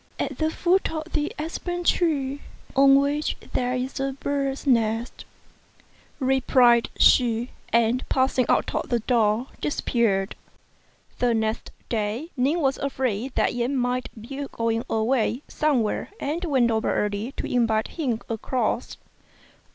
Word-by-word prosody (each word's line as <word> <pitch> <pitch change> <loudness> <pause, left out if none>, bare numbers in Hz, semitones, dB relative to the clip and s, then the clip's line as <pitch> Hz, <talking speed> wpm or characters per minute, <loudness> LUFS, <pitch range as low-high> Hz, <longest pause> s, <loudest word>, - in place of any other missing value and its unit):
"At - - -3
the 315 0 +2
foot 360 +4 +1
of 315 +1 -6
the 300 0 0
aspen 350 +3 -4
tree 285 -6 +1 0.3
on 275 0 +7
which 290 +2 0 0.2
there 250 0 0
is 255 +2 -3
a 270 0 -1
bird's 275 0 -2
nest," 230 -2 0 0.9
replied 255 -3 +4
she; 240 -1 +4 0.2
and 235 +2 +2
passing 260 -1 +2
out - - +2
of - - -2
the 240 -2 +1
door, 225 0 +2 0.2
disappeared. 225 -9 0 0.8
The 240 -2 +2
next 220 0 -1 0.2
day 225 - -2
Ning 285 +6 +1
was 270 -2 +1
afraid 260 -3 -2
that - - +2
Yen 245 +3 -1
might 250 0 -1
be 275 +5 -6
going 230 0 -1
away 235 +3 0
some 295 -6 +1
where, 210 - -3
and 315 +5 -2
went 260 -7 +2
over 220 0 0
early 210 +5 -1
to - - -5
invite 225 -3 +1
him 255 -9 -2
across. 230 +1 -2
255 Hz, 135 wpm, -24 LUFS, 230-280 Hz, 0.9 s, on